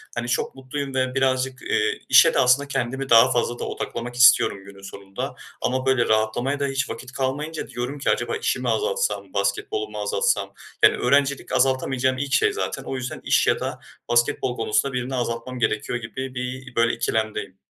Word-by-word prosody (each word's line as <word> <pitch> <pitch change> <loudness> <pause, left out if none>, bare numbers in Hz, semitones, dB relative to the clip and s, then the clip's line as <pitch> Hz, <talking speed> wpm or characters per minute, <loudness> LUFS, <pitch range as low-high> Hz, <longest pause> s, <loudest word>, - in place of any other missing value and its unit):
hani, 120 0 -3
çok 120 - -1
mutluyum 135 +1 -5
ve 130 0 0
birazcık, 130 0 0
eee, 440 0 0
işe - - +7
de - - +2
aslında 130 +3 +4
kendimi 135 0 -3
daha 115 +3 +7
fazla 120 0 0
da - - -4
odaklamak 120 +1 -5
istiyorum 110 -5 +5
günün 100 0 -13
sonunda 100 0 -7 0.3
ama 130 +1 -1
böyle, 130 -3 +2
rahatlamaya 110 +6 +1
da 140 - 0
hiç 135 0 -2
vakit 130 - -7
kalmayınca 145 +4 -3
diyorum 125 +3 -5
ki: - - -1
"Acaba 455 - 0
işi - - -1
mi - - -2
azaltsam, 485 +2 -1
basketbolu 420 0 -1
mu - - -8
azaltsam?" 475 +1 0 0.3
yani, - - +7
öğrencilik 140 -1 +1
azaltamayacağım 130 0 +1
ilk 140 0 -3
şey 430 -1 +3
zaten. 430 - -3
O - - -5
yüzden 125 -1 -5
iş - - +2
ya - - +3
da - - -4 0.3
basketbol 120 +1 +1
konusunda 115 +4 0
birini 125 +1 -3
azaltmam 120 +1 -3
gerekiyor 120 +1 -1
gibi 130 +3 -6
bir, 125 0 -5
böyle, 115 0 +3
ikilemdeyim. 110 -3 -2
130 Hz, 180 wpm, -23 LUFS, 120-140 Hz, 0.3 s, işe